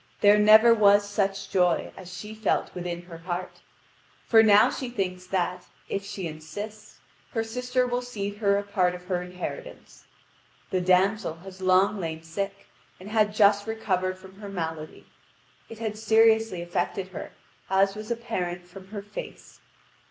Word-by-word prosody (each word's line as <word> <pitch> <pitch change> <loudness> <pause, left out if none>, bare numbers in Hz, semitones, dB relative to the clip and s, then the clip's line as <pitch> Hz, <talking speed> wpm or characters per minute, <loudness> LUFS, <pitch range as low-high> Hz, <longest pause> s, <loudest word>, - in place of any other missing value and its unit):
There 205 0 +6
never 215 +2 +8
was 205 -2 +5
such 195 -1 -2
joy 180 -3 +2
as 185 -1 -10
she 210 +5 -8
felt 220 -1 -1
within 175 -1 -5
her 170 -2 -11
heart. 175 +1 -5 0.6
For 225 -1 +6
now 215 +2 +6
she 255 - -4
thinks 185 -5 -3
that, 180 -1 -2 0.2
if 200 - -2
she 195 -2 -6
insists, 205 +8 -8 0.4
her 225 -3 0
sister 250 +2 -1
will 245 0 -1
cede 205 -5 -5
her 200 -2 +2
a 200 - -1
part 185 -3 +1
of 180 - -10
her 180 -1 -1
inheritance. 180 0 -8 0.7
The 185 - +1
damsel 185 0 +2
had 190 +2 -12
long 190 +3 +3
lain 160 -2 -4
sick, 195 +5 -5 0.3
and 195 +3 -10
had 210 -1 +2
just 205 0 +4
recovered 185 -4 -1
from 190 +1 -15
her 205 -1 -8
malady. 160 -4 -5 0.6
It 225 - -9
had 220 -1 -3
seriously 220 -4 +3
affected 185 +2 -2
her, 185 - -8 0.4
as 195 +1 +3
was 215 +2 -8
apparent 185 -7 -3
from 185 +1 -13
her 205 0 -7
face. 205 +1 -9
195 Hz, 160 wpm, -26 LUFS, 180-215 Hz, 0.7 s, never